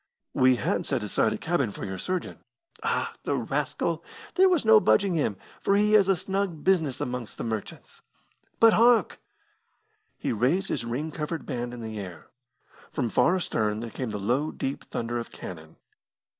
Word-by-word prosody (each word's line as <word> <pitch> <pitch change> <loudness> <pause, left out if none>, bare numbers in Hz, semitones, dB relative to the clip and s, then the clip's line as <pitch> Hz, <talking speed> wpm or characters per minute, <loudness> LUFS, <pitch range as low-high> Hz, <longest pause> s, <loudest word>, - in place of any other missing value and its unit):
"We 130 0 +5
had 115 - -1
set - - 0
aside 110 +1 +1
a - - -2
cabin 160 -8 0
for - - -7
your 95 -1 -5
surgeon." 185 - -3 0.4
"Ah, 460 +1 -1
the - - -1
rascal! - - -1 0.3
There 375 +1 +5
was 345 -9 +2
no 220 0 +8
budging 200 -3 +3
him, 140 - 0 0.2
for 200 - +2
he 210 +1 +3
has 200 -3 +6
a 195 - +5
snug 185 -3 -2
business 165 -8 +2
amongst 125 -4 -4
the - - -4
merchants. 110 -3 -6 0.6
But 225 -1 +7
hark!" 230 -3 +4 1.0
He - - -2
raised 135 - +1
his - - -2
ring 135 +7 -3
covered 155 +1 -4
band 120 -3 -3
in 120 -1 -8
the 110 -1 -5
air. 90 -4 -9 0.6
From 120 - -1
far 175 +10 +3
astern 110 - -1
there 115 0 -6
came 125 +1 -4
the 105 - -3
low, 125 +10 0
deep 135 -2 -4
thunder 120 +1 -3
of 115 - -6
cannon. 80 -3 -9
135 Hz, 175 wpm, -27 LUFS, -, 1.0 s, no